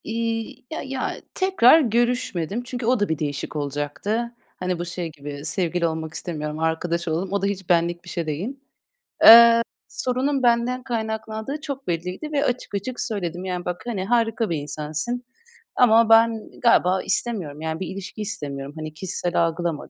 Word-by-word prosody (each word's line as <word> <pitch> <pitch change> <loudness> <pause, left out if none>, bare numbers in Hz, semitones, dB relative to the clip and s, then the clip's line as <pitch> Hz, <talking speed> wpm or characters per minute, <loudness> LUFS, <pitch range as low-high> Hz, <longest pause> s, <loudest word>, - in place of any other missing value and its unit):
İii, 225 +1 -3
ya 315 - -3
ya 265 -1 -4
tekrar 375 -7 +6
görüşmedim 240 - 0
çünkü 245 -1 -5
o 250 0 +3
da 205 - 0
bir 160 -2 -1
değişik 145 0 -3
olacaktı. 145 - -2 0.2
Hani, 180 -1 -2
bu 175 - -2
şey 175 -1 -4
gibi, 145 0 -8
"Sevgili 170 +1 0
olmak 160 -1 -4
istemiyorum, 155 -3 -4
arkadaş 170 +1 -1
olalım." 170 +4 -1
O 200 - +1
da - - 0
hiç 195 -2 -3
benlik 175 0 +2
bir 175 - -11
şey 170 -2 -3
değil. 185 - -4 0.7
Eee, 235 +1 +12 0.4
sorunun 260 +2 -1
benden 240 +1 +2
kaynaklandığı 220 +2 -4
çok 280 -3 -6
belliydi 180 - -3
ve 290 -1 +1
açık 245 -5 -2
açık 240 +5 -4
söyledim. 185 -5 -3
"Yani, 180 -1 -3
bak, 180 0 -3
hani, 210 -6 -3
harika 225 0 +1
bir 165 - 0
insansın 155 +11 -3 0.5
ama 230 -2 +5
ben 225 -1 +4
galiba 190 -5 +4
istemiyorum. 175 -11 -1
Yani 160 0 -3
bir 190 - -4
ilişki 195 +3 -7
istemiyorum. 140 -7 -4
Hani, 155 -1 -6
kişisel 175 0 -1
algılama." 165 -2 -3
190 Hz, 165 wpm, -23 LUFS, 165-235 Hz, 0.7 s, Eee